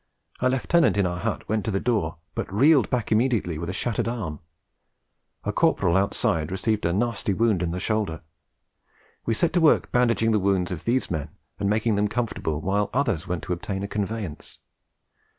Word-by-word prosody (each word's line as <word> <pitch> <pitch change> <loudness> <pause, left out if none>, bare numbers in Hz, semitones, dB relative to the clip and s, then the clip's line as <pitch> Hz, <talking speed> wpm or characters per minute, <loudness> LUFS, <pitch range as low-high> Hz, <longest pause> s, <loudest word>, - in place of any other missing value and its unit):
A 130 - +2
Lieutenant 135 +1 +2
in 100 - +3
our 90 0 -2
hut - - -3
went 110 0 0
to - - -1
the 95 -2 0
door, 95 -9 0 0.2
but - - -4
reeled 135 +7 +4
back 120 -4 -1
immediately 110 -8 +1
with 85 - -4
a - - -1
shattered 115 +3 -1
arm. 100 -11 -4 1.0
A - - -2
Corporal 85 - +2
outside 85 -5 +1
received 105 0 0
a - - +1
nasty 105 0 0
wound 110 -5 +2
in 85 - 0
the 90 +2 -3
shoulder. 100 -5 -1 1.1
We 115 - +2
set 170 +8 +1
to 175 - +3
work 160 - +4
bandaging 115 -2 +2
the 105 - +3
wounds 95 -2 +1
of 90 - -5
these 125 -2 +1
men 80 -4 -2 0.3
and 100 -1 0
making 110 0 +1
them 105 +1 +2
comfortable 105 -9 -2
while 100 +4 0
others 120 - 0
went 90 -2 -3
to 90 - -2
obtain 95 +3 -4
a - - -2
conveyance. 105 -5 -4
105 Hz, 185 wpm, -25 LUFS, 90-115 Hz, 1.1 s, reeled